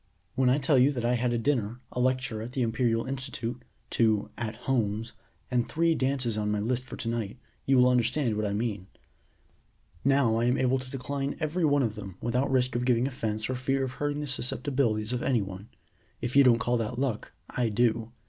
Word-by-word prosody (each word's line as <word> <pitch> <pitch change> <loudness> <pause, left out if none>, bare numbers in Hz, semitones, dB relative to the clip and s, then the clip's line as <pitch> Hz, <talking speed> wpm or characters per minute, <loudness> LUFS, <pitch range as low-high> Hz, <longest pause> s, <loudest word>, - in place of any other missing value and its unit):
"When 130 0 +3
I 130 - +4
tell 140 -1 +3
you 135 +3 +5
that 120 -3 -2
I 120 - +2
had 125 0 +1
a 120 - +1
dinner, 115 -2 0
a - - -4
lecture 125 -3 0
at 120 +3 -7
the 130 - 0
Imperial 115 0 +1
institute, 130 -3 -4 0.3
two 110 -3 +2
'at 115 -2 -4
homes,' 115 -3 0 0.4
and 120 -1 +1
three 165 +1 +2
dances 130 -6 0
on 105 0 -1
my 105 0 0
list 125 +4 -1
for - - -8
to - - -5
night, 115 -1 -2 0.3
you 135 -1 +4
will 125 0 +6
understand 125 0 +2
what 105 0 0
I - - -2
mean. 105 -3 -2 1.2
Now 135 -5 +3
I 115 - +1
am 125 +2 +2
able 130 +1 +2
to 130 0 -9
decline 140 +1 -3
every 160 +2 0
one 145 -2 +3
of 110 -3 0
them 100 -4 -8
without 125 +4 0
risk 130 -2 +1
of 120 - 0
giving 125 -1 +2
offense 110 -5 -2
or 130 - -2
fear 135 +2 0
of 130 - -2
hurting 145 +2 -2
the 150 - -4
susceptibilities 125 -4 0
of 125 - -1
any 120 -6 +1
one. 95 +2 -9 0.5
If 120 +2 -4
you 140 - +8
don't 125 -3 +6
call 120 +1 0
that 115 -1 -3
luck, 130 -5 -2
I 120 -2 -1
do. 115 +1 +1
125 Hz, 215 wpm, -28 LUFS, 115-130 Hz, 1.2 s, you